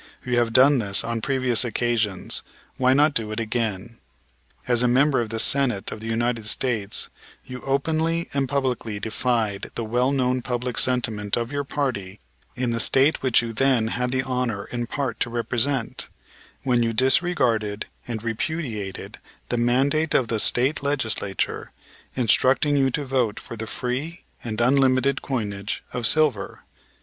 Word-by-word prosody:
You 125 Hz, -1 st, +1 dB
have 115 Hz, -1 st, +1 dB
done 135 Hz, +3 st, +5 dB
this 100 Hz, -2 st, +1 dB
on 115 Hz, 0 st, -3 dB
previous 130 Hz, -2 st, +2 dB
occasions, 115 Hz, -4 st, -1 dB, 0.4 s
why 130 Hz, 0 st, +3 dB
not 145 Hz, +2 st, +4 dB
do 110 Hz, -4 st, -2 dB
it 110 Hz, -, -3 dB
again? 115 Hz, -1 st, -3 dB, 0.7 s
As 120 Hz, -1 st, +3 dB
a 125 Hz, -, +3 dB
member 135 Hz, +2 st, +3 dB
of 115 Hz, -, -4 dB
the 115 Hz, -, -4 dB
Senate 125 Hz, -4 st, +2 dB
of -, -, -6 dB
the 110 Hz, -, -7 dB
United 115 Hz, 0 st, -1 dB
States 110 Hz, -4 st, +1 dB, 0.4 s
you 125 Hz, 0 st, -8 dB
openly 160 Hz, +4 st, 0 dB
and 135 Hz, -2 st, 0 dB
publicly 125 Hz, -6 st, -2 dB
defied 110 Hz, -2 st, -1 dB
the 120 Hz, -, -2 dB
well 125 Hz, +4 st, +1 dB
known 130 Hz, -2 st, +1 dB
public 125 Hz, 0 st, -2 dB
sentiment 115 Hz, -5 st, +1 dB
of 120 Hz, +1 st, -3 dB
your 145 Hz, 0 st, -2 dB
party 115 Hz, -9 st, -3 dB, 0.4 s
in 125 Hz, -1 st, -1 dB
the 115 Hz, -, -1 dB
State 135 Hz, +6 st, +3 dB
which 125 Hz, -3 st, +3 dB
you 115 Hz, -1 st, -5 dB
then 120 Hz, -2 st, +2 dB
had 125 Hz, +2 st, -1 dB
the 130 Hz, +1 st, 0 dB
honor 125 Hz, -6 st, -2 dB
in 120 Hz, -1 st, -4 dB
part 130 Hz, -3 st, -3 dB
to 120 Hz, -, -1 dB
represent, 120 Hz, +2 st, -1 dB, 0.5 s
when 125 Hz, -2 st, +2 dB
you 115 Hz, -1 st, 0 dB
disregarded 125 Hz, -6 st, +2 dB, 0.2 s
and 115 Hz, -2 st, -5 dB
repudiated 115 Hz, -, -4 dB, 0.3 s
the 120 Hz, -, 0 dB
mandate 135 Hz, +6 st, +2 dB
of 120 Hz, -4 st, +2 dB
the 115 Hz, -, 0 dB
State 130 Hz, +7 st, +2 dB
Legislature, 115 Hz, -9 st, -2 dB, 0.4 s
instructing 130 Hz, +4 st, +3 dB
you 135 Hz, -1 st, +3 dB
to 140 Hz, +3 st, -3 dB
vote 125 Hz, -5 st, 0 dB
for -, -, -7 dB
the 110 Hz, 0 st, -6 dB
free 135 Hz, +10 st, -3 dB, 0.2 s
and 110 Hz, -3 st, -4 dB
unlimited 135 Hz, +1 st, +3 dB
coinage 105 Hz, -6 st, -3 dB
of 120 Hz, -2 st, +1 dB
silver. 145 Hz, -10 st, +1 dB
125 Hz, 160 wpm, -23 LUFS, 115-135 Hz, 0.7 s, done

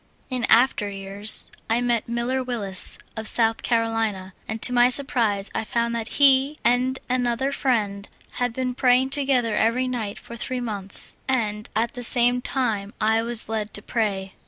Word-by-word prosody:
In 250 Hz, -2 st, 0 dB
after 230 Hz, -3 st, +3 dB
3'ears 200 Hz, +2 st, 0 dB, 0.2 s
I 225 Hz, +1 st, +2 dB
met 240 Hz, -2 st, -1 dB
Miller 240 Hz, +2 st, -1 dB
Willis, 205 Hz, -7 st, +1 dB, 0.2 s
of 220 Hz, -1 st, -5 dB
South 225 Hz, 0 st, +2 dB
Carolina, 225 Hz, -5 st, -1 dB
and 220 Hz, 0 st, -4 dB
to 250 Hz, -, +3 dB
my 245 Hz, 0 st, +5 dB
surprise 235 Hz, -7 st, 0 dB
I -, -, -2 dB
found 235 Hz, +1 st, -1 dB
that 230 Hz, -1 st, -3 dB
he 275 Hz, +1 st, +5 dB
and 250 Hz, +2 st, +1 dB
an 250 Hz, -1 st, 0 dB
other 240 Hz, +4 st, -1 dB
friend 210 Hz, -7 st, -1 dB, 0.3 s
had 245 Hz, -1 st, 0 dB
been 255 Hz, +1 st, -3 dB
praying 255 Hz, +1 st, +2 dB
together 265 Hz, -5 st, +1 dB
every 230 Hz, +4 st, +1 dB
night 225 Hz, -5 st, -4 dB
for 235 Hz, -, -10 dB
three 255 Hz, +2 st, -4 dB
months, 205 Hz, -5 st, 0 dB
and 215 Hz, -5 st, -1 dB
at 230 Hz, +2 st, 0 dB
the 245 Hz, -, -7 dB
same 245 Hz, +1 st, +4 dB
time 220 Hz, -6 st, -2 dB
I 220 Hz, +1 st, +2 dB
was 230 Hz, 0 st, +1 dB
led 220 Hz, -1 st, -4 dB
to 205 Hz, -, -7 dB
pray. 195 Hz, -5 st, -2 dB
235 Hz, 170 wpm, -23 LUFS, 215-250 Hz, 0.3 s, my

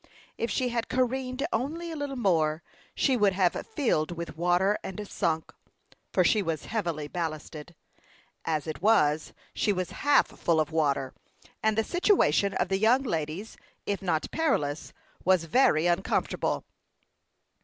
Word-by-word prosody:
If 230 Hz, -, -2 dB
she 255 Hz, -1 st, 0 dB
had 235 Hz, -1 st, -2 dB
careened 255 Hz, +1 st, -1 dB
only 320 Hz, +8 st, -2 dB
a -, -, -5 dB
little 285 Hz, -2 st, -4 dB
more, 165 Hz, -8 st, +1 dB, 0.3 s
she 265 Hz, -, +2 dB
would 205 Hz, -5 st, +3 dB
have 185 Hz, -2 st, +2 dB
filled 270 Hz, -, 0 dB
with 170 Hz, -2 st, -6 dB
water 175 Hz, +4 st, +2 dB
and 200 Hz, +2 st, -6 dB
sunk, 160 Hz, -4 st, -2 dB, 0.6 s
for -, -, +3 dB
she 215 Hz, -, +3 dB
was 165 Hz, -5 st, -3 dB
heavily 170 Hz, -9 st, -2 dB
ballasted. 160 Hz, 0 st, -5 dB, 0.7 s
As 155 Hz, -2 st, -1 dB
it 155 Hz, -1 st, -6 dB
was, 155 Hz, -8 st, +3 dB, 0.2 s
she 210 Hz, -, +1 dB
was 185 Hz, -2 st, -2 dB
half 285 Hz, 0 st, +3 dB
full 165 Hz, -2 st, 0 dB
of 155 Hz, -, 0 dB
water, 140 Hz, -4 st, 0 dB, 0.5 s
and 220 Hz, 0 st, +1 dB
the 220 Hz, -, +3 dB
situation 285 Hz, -, +2 dB
of 185 Hz, -, 0 dB
the 195 Hz, 0 st, +1 dB
young 240 Hz, +6 st, +4 dB
ladies, 165 Hz, -, -4 dB, 0.3 s
if 200 Hz, -1 st, -2 dB
not 170 Hz, -5 st, -1 dB
perilous, 150 Hz, -, -1 dB, 0.3 s
was 185 Hz, -2 st, +3 dB
very 165 Hz, -, +3 dB
uncomfortable. 175 Hz, +2 st, 0 dB
190 Hz, 145 wpm, -28 LUFS, 160-240 Hz, 0.7 s, young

